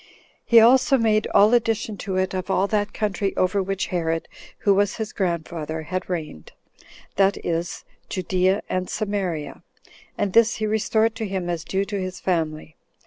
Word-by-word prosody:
He 235 Hz, -, +6 dB
also 260 Hz, +4 st, +5 dB
made 215 Hz, -2 st, +2 dB
all 210 Hz, +3 st, +5 dB
addition 225 Hz, -2 st, +1 dB
to 190 Hz, -1 st, -4 dB
it 185 Hz, 0 st, 0 dB
of 185 Hz, +1 st, -4 dB
all 190 Hz, 0 st, +2 dB
that 205 Hz, 0 st, -1 dB
country 205 Hz, -2 st, -2 dB
over 185 Hz, +2 st, +2 dB
which 195 Hz, 0 st, -2 dB
Herod, 165 Hz, -2 st, -1 dB, 0.3 s
who 200 Hz, -, +4 dB
was 200 Hz, 0 st, +1 dB
his 220 Hz, -1 st, -5 dB
grandfather, 160 Hz, -3 st, -3 dB
had 185 Hz, +4 st, -4 dB
reigned, 155 Hz, -, -5 dB, 0.6 s
that 195 Hz, 0 st, +3 dB
is, 170 Hz, 0 st, -3 dB, 0.2 s
Judea 185 Hz, +1 st, 0 dB
and 185 Hz, 0 st, -2 dB
Samaria; 195 Hz, -8 st, -3 dB, 0.6 s
and 195 Hz, -2 st, -1 dB
this 230 Hz, -1 st, +5 dB
he 215 Hz, -, -2 dB
restored 220 Hz, +1 st, +1 dB
to 220 Hz, -2 st, -3 dB
him 185 Hz, -2 st, -3 dB
as 165 Hz, -2 st, -3 dB
due 195 Hz, +4 st, -1 dB
to 200 Hz, -1 st, -3 dB
his 185 Hz, 0 st, -5 dB
family. 160 Hz, -3 st, -2 dB
195 Hz, 165 wpm, -23 LUFS, 175-215 Hz, 0.6 s, He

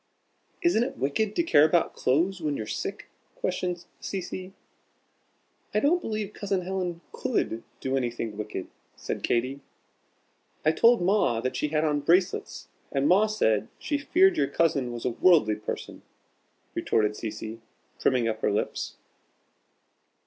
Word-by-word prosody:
"Isn't 345 Hz, -10 st, +4 dB
it -, -, -4 dB
wicked 200 Hz, +11 st, 0 dB
to 340 Hz, -, +2 dB
care 150 Hz, -, +5 dB
about 160 Hz, +2 st, +3 dB
clothes 170 Hz, +8 st, +1 dB
when 150 Hz, -2 st, -1 dB
you're 110 Hz, -, -4 dB
sick?" -, -, -4 dB, 0.3 s
questioned 180 Hz, -1 st, -2 dB
Cecy. 185 Hz, 0 st, -5 dB, 1.2 s
"I -, -, +5 dB
don't 335 Hz, +8 st, +3 dB
believe 215 Hz, -, -3 dB
Cousin 195 Hz, -2 st, -1 dB
Helen 180 Hz, -2 st, -3 dB
could 225 Hz, -, -1 dB, 0.2 s
do 130 Hz, 0 st, -1 dB
anything 120 Hz, -4 st, -2 dB
wicked," 105 Hz, -3 st, -5 dB, 0.3 s
said -, -, -4 dB
Katy. 130 Hz, +4 st, 0 dB, 1.1 s
"I 155 Hz, -, +6 dB
told 230 Hz, +5 st, +5 dB
Ma 185 Hz, -, +2 dB
that 130 Hz, -, -2 dB
she -, -, 0 dB
had 155 Hz, +1 st, +1 dB
on 150 Hz, -1 st, +1 dB
bracelets, 175 Hz, +5 st, +1 dB, 0.2 s
and 135 Hz, +1 st, +1 dB
Ma 195 Hz, +6 st, +5 dB
said 110 Hz, -, +1 dB
she 290 Hz, -2 st, -2 dB
feared 360 Hz, +5 st, +4 dB
your -, -, +2 dB
cousin 140 Hz, -7 st, +1 dB
was 120 Hz, -1 st, -6 dB
a 125 Hz, -, +1 dB
worldly 150 Hz, -5 st, +4 dB
person," 105 Hz, -, -6 dB, 0.7 s
retorted 105 Hz, -1 st, +1 dB
Cecy, 110 Hz, +1 st, -6 dB, 0.4 s
primming 125 Hz, -3 st, +2 dB
up 110 Hz, -1 st, -2 dB
her -, -, +2 dB
lips. 105 Hz, -, -2 dB
160 Hz, 140 wpm, -27 LUFS, 120-195 Hz, 1.2 s, I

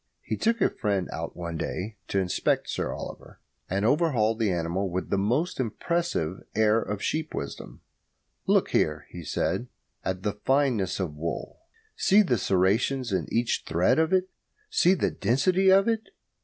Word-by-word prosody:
He -, -, -2 dB
took 230 Hz, -1 st, 0 dB
a -, -, +4 dB
friend 100 Hz, -4 st, -1 dB
out 80 Hz, +1 st, -5 dB
one 85 Hz, -1 st, -4 dB
day 105 Hz, +3 st, -4 dB
to -, -, -2 dB
inspect 95 Hz, -2 st, +1 dB
Sir -, -, -2 dB
Oliver, -, -, -8 dB, 0.3 s
and 100 Hz, +3 st, 0 dB
overhauled 120 Hz, -6 st, +2 dB
that 110 Hz, -2 st, +2 dB
animal 90 Hz, +2 st, -1 dB
with 90 Hz, +1 st, -3 dB
a -, -, +3 dB
most 130 Hz, -, 0 dB
impressive 130 Hz, -, -1 dB
air 110 Hz, +1 st, +4 dB
of 105 Hz, -2 st, -4 dB
sheep 155 Hz, 0 st, -2 dB
wisdom. 70 Hz, -, -6 dB, 0.7 s
"Look -, -, +3 dB
here," -, -, +1 dB
he 85 Hz, -, -8 dB
said, 95 Hz, +9 st, -1 dB, 0.4 s
"at 95 Hz, 0 st, -3 dB
the 105 Hz, -, 0 dB
fineness 125 Hz, -5 st, +1 dB
of 90 Hz, -6 st, -2 dB
the 75 Hz, -, -14 dB
wool. 85 Hz, -, -4 dB, 0.4 s
See 210 Hz, +2 st, +5 dB
the 125 Hz, -, +1 dB
serrations 105 Hz, +8 st, +1 dB
in 95 Hz, -, 0 dB
each 120 Hz, 0 st, +1 dB
thread 85 Hz, -, +3 dB
of 160 Hz, +2 st, +2 dB
it. 185 Hz, 0 st, +3 dB, 0.4 s
See 190 Hz, -, +4 dB
the -, -, 0 dB
density 180 Hz, -, +2 dB
of 195 Hz, +3 st, +5 dB
it. 225 Hz, -1 st, -1 dB
110 Hz, 170 wpm, -27 LUFS, 95-155 Hz, 0.7 s, See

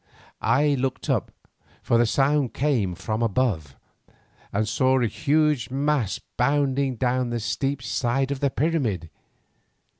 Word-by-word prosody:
I 145 Hz, +3 st, +3 dB
looked 130 Hz, 0 st, -2 dB
up, -, -, -1 dB, 0.5 s
for 115 Hz, -, +2 dB
the 120 Hz, -, +4 dB
sound 140 Hz, +1 st, +1 dB
came 120 Hz, -11 st, 0 dB
from 110 Hz, +5 st, -3 dB
above, 105 Hz, -, 0 dB, 0.8 s
and 105 Hz, +2 st, 0 dB
saw 130 Hz, +3 st, +2 dB
a 120 Hz, -, +2 dB
huge 150 Hz, -1 st, +1 dB
mass 135 Hz, -7 st, 0 dB, 0.2 s
bounding 135 Hz, 0 st, +1 dB
down 125 Hz, +1 st, 0 dB
the 120 Hz, 0 st, -2 dB
steep 130 Hz, +5 st, -2 dB
side 135 Hz, +3 st, 0 dB
of 140 Hz, -, -2 dB
the 140 Hz, -, +2 dB
pyramid. 130 Hz, -, -1 dB
130 Hz, 130 wpm, -24 LUFS, 115-140 Hz, 0.8 s, the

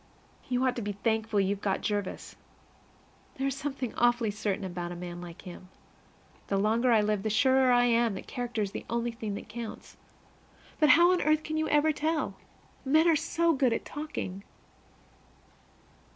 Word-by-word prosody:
You 250 Hz, +1 st, +1 dB
ought 255 Hz, -1 st, +1 dB
to -, -, -2 dB
be 205 Hz, -1 st, -3 dB
thankful 220 Hz, 0 st, 0 dB
you've 195 Hz, +1 st, -1 dB
got 195 Hz, -2 st, -1 dB
Jervis. 205 Hz, -3 st, -3 dB, 1.0 s
There 270 Hz, -, -2 dB
is 275 Hz, -1 st, 0 dB
something 275 Hz, -3 st, -4 dB
awfully 240 Hz, -2 st, +2 dB
certain 205 Hz, -1 st, -2 dB
about 175 Hz, -1 st, -5 dB
a -, -, -5 dB
man 175 Hz, 0 st, -7 dB
like 175 Hz, 0 st, -10 dB
him. 180 Hz, 0 st, -10 dB, 0.8 s
The 195 Hz, -, 0 dB
longer 225 Hz, +5 st, +2 dB
I 220 Hz, -2 st, +5 dB
live, 210 Hz, -1 st, 0 dB
the 220 Hz, -, -2 dB
surer 260 Hz, +3 st, +4 dB
I 245 Hz, 0 st, +5 dB
am 235 Hz, -3 st, +2 dB
that -, -, -7 dB
character 240 Hz, -3 st, -3 dB
is 195 Hz, -, -4 dB
the -, -, -6 dB
only 235 Hz, +1 st, -1 dB
thing 220 Hz, -3 st, -5 dB
that -, -, -8 dB
counts. 225 Hz, +1 st, -8 dB, 0.8 s
But 305 Hz, -2 st, +4 dB
how 345 Hz, +3 st, +7 dB
on 365 Hz, -, +2 dB
earth 310 Hz, +1 st, +2 dB
can 310 Hz, -, -4 dB
you 315 Hz, 0 st, 0 dB
ever 300 Hz, +1 st, +4 dB
tell? 310 Hz, +1 st, -1 dB, 0.5 s
Men 310 Hz, +5 st, +4 dB
are 330 Hz, -, +5 dB
so 330 Hz, +2 st, +1 dB
good 260 Hz, -4 st, +2 dB
at -, -, -3 dB
talking! 290 Hz, -11 st, -5 dB
235 Hz, 180 wpm, -29 LUFS, 205-275 Hz, 1.0 s, how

